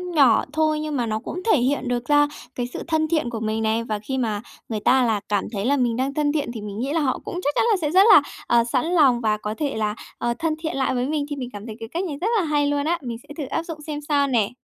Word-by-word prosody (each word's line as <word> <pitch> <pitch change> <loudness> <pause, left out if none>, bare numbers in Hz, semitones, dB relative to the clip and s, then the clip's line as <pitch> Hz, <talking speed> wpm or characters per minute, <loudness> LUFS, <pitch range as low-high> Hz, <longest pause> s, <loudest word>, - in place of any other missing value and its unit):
nhỏ 265 -7 +5
thôi 310 -1 +2
nhưng 305 -1 -3
mà 245 - 0
nó 220 -1 -1
cũng 340 +9 -6
thể 325 - +5
hiện 260 +1 0
được 245 -1 -1
ra 290 +1 +4 0.3
cái 245 -1 -2
sự - - -5
thân 315 -1 +1
thiện 310 -7 0
của 230 -2 -4
mình 220 0 -1
này, 220 +1 +1
và 215 -2 -3
khi 265 +5 -4
mà 220 -5 -1 0.3
người 220 - -2
ta 255 +5 +4
là 220 -3 +1
cảm 205 -2 +1
thấy 200 -2 -3
là 285 +3 +3
mình 240 -3 +1
đang 265 +2 -1
thân 295 0 +1
thiện 290 -5 -1
thì 220 - -6
mình 205 0 -6
nghĩ 270 +4 -2
là 330 - +2
họ 265 -3 0
cũng 355 - -4
chắc 290 - +1
chắn - - +3
là 415 - +3
sẽ 300 -2 0
rất 375 +3 +7
là, 300 - +9 0.3
ờ, 235 0 +4
sẵn 245 +4 0
lòng 285 -9 +4
và 215 -1 +1
có 210 0 -4
thể 295 -3 -2
là, 215 -1 -1 0.2
ờ, 240 0 0
thân 325 -2 0
thiện 320 -1 -3
lại 265 - +1
với 250 +1 0
mình, 295 -1 -1
thì 290 - -3
mình 250 -3 -5
cảm 205 +1 -8
thấy 220 -2 -7
cái 225 -1 -7
cách 340 +7 -2
này 330 -6 -3
rất 405 - +1
là - - +1
hay 295 -1 +1
luôn 285 0 0
á, 340 +2 +1
mình 240 -4 -5
sẽ - - -43
thử 290 - -3
áp 275 - -2
dụng 330 -3 -7
xem 295 -1 -5
sao 290 -1 +1
nè! 230 -6 +2
265 Hz, 310 wpm, -23 LUFS, 230-300 Hz, 0.3 s, là